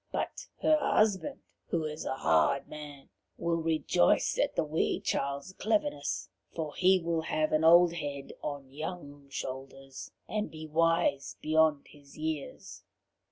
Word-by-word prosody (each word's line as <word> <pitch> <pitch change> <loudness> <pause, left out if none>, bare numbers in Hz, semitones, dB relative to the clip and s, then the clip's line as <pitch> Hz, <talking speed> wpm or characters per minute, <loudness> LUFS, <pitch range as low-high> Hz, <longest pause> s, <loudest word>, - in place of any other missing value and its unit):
But - - -3 0.2
her 310 -1 +5
husband, 215 0 +1 0.3
who 165 -2 -1
is 155 +1 -5
a - - -1
hard 80 - +2
man, 145 -2 -10 0.3
will 170 0 0
rejoice 160 - +2
at - - +1
the - - +2
wee 155 +1 0
child's 140 +6 -2
cleverness. 225 - -1 0.3
For 155 -3 -3
he 190 0 +4
will 165 -1 -1
have 155 -1 0
an 155 +1 +2
old 170 +1 +7
head 145 -4 -5
on 140 -3 -5
young 145 -2 -7
shoulders, 135 0 -7 0.2
and 215 0 -2
be 155 0 -8
wise 165 -3 +1
beyond 155 -1 +3
his 145 0 -17
years." 155 -2 -5
155 Hz, 140 wpm, -30 LUFS, 140-170 Hz, 0.3 s, old